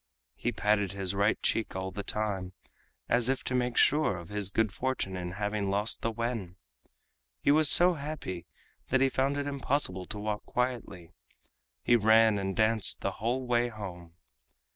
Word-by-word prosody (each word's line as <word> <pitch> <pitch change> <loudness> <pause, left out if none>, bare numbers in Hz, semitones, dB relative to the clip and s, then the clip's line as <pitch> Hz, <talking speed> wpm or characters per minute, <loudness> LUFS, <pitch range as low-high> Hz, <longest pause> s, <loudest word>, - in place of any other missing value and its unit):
He 120 - -3
patted 105 -3 0
his 95 -1 -3
right 100 +2 +1
cheek 115 - -1
all 95 0 -4
the 100 - -5
time, 100 -3 -3 0.5
as 120 +1 +3
if 135 - -1
to - - -3
make 125 -1 -1
sure 150 -10 +3
of 85 -2 -10
his 105 -2 +1
good 110 0 0
fortune 130 -7 -3
in 90 -1 -5
having 105 0 -2
lost 105 +3 -1
the 115 - -1
wen. 115 -5 -4 0.8
He - - +2
was 155 0 +6
so 180 +1 +8
happy 140 - -6 0.4
that 130 - +2
he 135 0 +3
found 135 +2 0
it 145 - -2
impossible 135 -9 -1
to 105 - -7
walk 105 0 -3
quietly—he 85 - -4
ran 110 -1 +4
and 95 -1 -3
danced 110 -1 +1
the - - -1
whole 125 +3 -1
way 120 0 +1
home. 90 -7 -9
110 Hz, 165 wpm, -29 LUFS, 95-125 Hz, 0.8 s, so